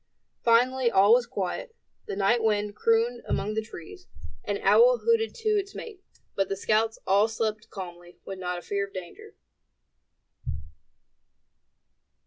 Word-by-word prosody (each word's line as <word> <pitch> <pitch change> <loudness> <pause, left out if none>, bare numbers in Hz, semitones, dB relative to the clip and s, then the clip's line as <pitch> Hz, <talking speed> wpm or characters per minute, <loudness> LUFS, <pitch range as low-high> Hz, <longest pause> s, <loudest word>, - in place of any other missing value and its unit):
Finally 245 +2 +3
all 200 0 +5
was 245 0 +3
quiet. 205 - -4 0.3
The - - -4
night 205 +4 +2
wind 210 -1 0
crooned 230 +2 +1
among 210 +2 -1
the 220 - -1
trees; 215 - -11 0.4
an - - -2
owl - - +6
hooted 460 -1 +2
to 450 -2 -2
its 405 -2 0
mate; 420 -5 -8 0.3
but 195 -1 0
the 195 - -2
scouts 220 +2 +1
all 200 +3 +4
slept 220 -1 -3
calmly, 175 -2 -9
with 190 -1 -7
not 180 -1 -3
a 175 - -8
fear 200 0 -2
of 195 - -22
danger. 180 -2 -9
220 Hz, 140 wpm, -27 LUFS, 195-250 Hz, 0.4 s, owl